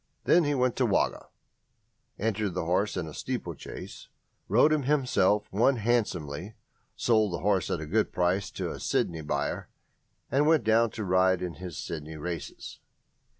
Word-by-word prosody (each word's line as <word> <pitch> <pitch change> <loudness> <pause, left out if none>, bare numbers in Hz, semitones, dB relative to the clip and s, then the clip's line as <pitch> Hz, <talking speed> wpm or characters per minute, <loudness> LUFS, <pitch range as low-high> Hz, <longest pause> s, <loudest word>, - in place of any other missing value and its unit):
Then 175 -1 +4
he 145 0 +1
went 125 -2 +1
to 130 - +3
Wagga, 100 - 0 0.9
entered 105 -3 -1
the 90 - -2
horse 95 +5 +1
in 90 - -2
a 80 - -8
steeplechase, - - -6 0.4
rode 125 +9 +5
him 155 - +2
himself, 125 -8 +2
won 120 +7 +3
handsomely, 105 - -1 0.4
sold 110 -5 +2
the 85 - -3
horse 100 -2 +2
at - - -1
a 80 - -5
good 105 +8 +1
price 90 +2 0
to - - -4
a - - -7
Sydney 80 -2 -1
buyer, 75 -1 -2 0.6
and 145 +2 +3
went 160 -5 +4
down 110 +2 +4
to 110 - -6
ride 95 0 +3
it - - 0
in 85 - -5
his 90 -3 -8
Sydney 80 0 -6
races. 85 -1 -6
100 Hz, 165 wpm, -28 LUFS, 85-115 Hz, 0.9 s, rode